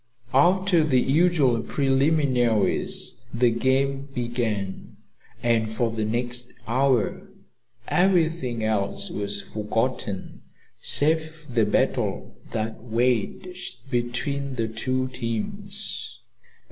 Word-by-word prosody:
After 180 +4 +4
the 135 -5 +3
usual 140 -4 +3
preliminaries, 135 -4 +1
the 120 0 +3
game 135 +3 +1
began, 115 -6 -3 0.5
and 115 -2 +2
for 115 +1 0
the 110 -1 -2
next 120 +2 -1
hour 130 -1 +1 0.6
everything 165 - +2
else 105 -2 0
was 100 0 -3
forgotten 110 -1 -3 0.4
save 160 +2 +2
the 115 -5 +1
battle 105 - 0 0.2
that 110 0 -3
waged 125 - -2
between 130 +3 -2
the 115 -2 -1
two 130 +4 -1
teams. 115 -4 -4
125 Hz, 90 wpm, -25 LUFS, 115-140 Hz, 0.6 s, After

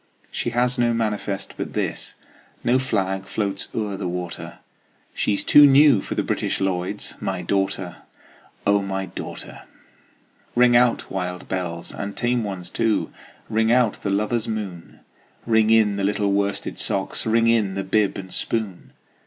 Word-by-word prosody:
She - - -2
has 125 +1 +1
no 120 -1 +2
manifest 105 -3 -2
but - - -5
this, - - -3 0.5
No 125 +2 +3
flag 95 -6 -1
floats 100 -2 -2
o'er 105 -3 -2
the 95 - -3
water, 90 -1 -5 0.6
She's 100 -1 0
too 145 0 +8
new 140 -5 +6
for - - -5
the - - 0
British - - -1
Lloyds 95 +1 -2
My 95 -2 -2
daughter, 95 -2 -1 0.7
O 100 0 +4
my 95 0 -3
daughter! - - -8 0.9
Ring 120 0 +5
out, 120 0 +3
wild 90 -1 -4
bells, 85 -3 -4
and 100 0 -5
tame 120 -1 +1
ones 95 -4 -5
too! 115 -2 0 0.4
Ring 110 0 +2
out 120 -3 +2
the 100 - -2
lover's 105 +3 0
moon! 100 -6 -6 0.4
Ring 110 -1 +3
in 110 -3 +4
the 100 - -1
little 100 0 +1
worsted 100 0 -1
socks! 95 +3 -1
Ring 115 +1 +3
in 110 -5 +2
the 95 - -2
bib 100 +1 +1
and 95 -1 -8
spoon! 105 -6 -3
100 Hz, 155 wpm, -23 LUFS, 95-115 Hz, 0.9 s, too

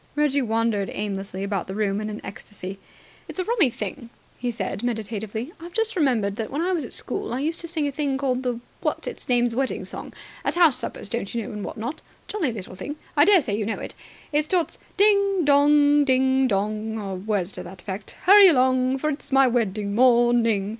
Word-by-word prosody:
Reggie 295 -2 +2
wandered 225 -4 0
aimlessly 195 -2 -4
about 200 -2 -2
the 190 - -5
room 205 -1 0
in 215 - -3
an 215 - -5
ecstasy. 195 -1 -8 0.5
"It's - - -6
a 370 - 0
rummy 430 - +2
thing," 230 +2 -6 0.3
he 245 - -3
said 210 -4 -4
meditatively, 220 - -4
"I've 340 +1 -10
just 450 0 0
remembered 230 - +1
that, 225 -2 -3
when 295 +4 -2
I 365 - 0
was 335 -5 -1
at - - -9
school, - - -4
I - - -2
used 320 +3 -1
to 340 - -5
sing 320 -3 -1
a - - -2
thing 280 -1 -1
called 260 -2 0
the 245 -2 -2 0.2
what's - - -2
it's - - -7
name's 240 -1 +2
wedding 265 +2 -1
song. - - -6 0.3
At - - 0
house 330 -7 +5
suppers, - - -4
don't 235 -3 -4
you 230 - -1
know, - - -7
and 210 -1 -5
what - - -6
not. 240 +8 -5 0.3
Jolly 355 -11 -1
little 200 -5 -8
thing. 285 +10 -6 0.2
I 290 0 +6
daresay 340 - +4
you 215 - -1
know 220 +2 -2
it. - - -7 0.4
It 300 +1 +3
starts 345 +2 -1 0.2
'Ding 400 -3 +4
dong! 290 0 +5
Ding 265 0 +3
dong!' 215 +1 -1
or 200 -3 -4
words 200 -1 -2
to - - -7
that 175 0 -11
effect, 195 0 -6
'Hurry 400 +2 +9
along! 255 -3 +3
For 305 +3 -1
it 280 - -5
is - - -11
my 270 0 +6
wedding 215 -5 0
morning!' 235 -3 +4
245 Hz, 215 wpm, -24 LUFS, 210-290 Hz, 0.5 s, Hurry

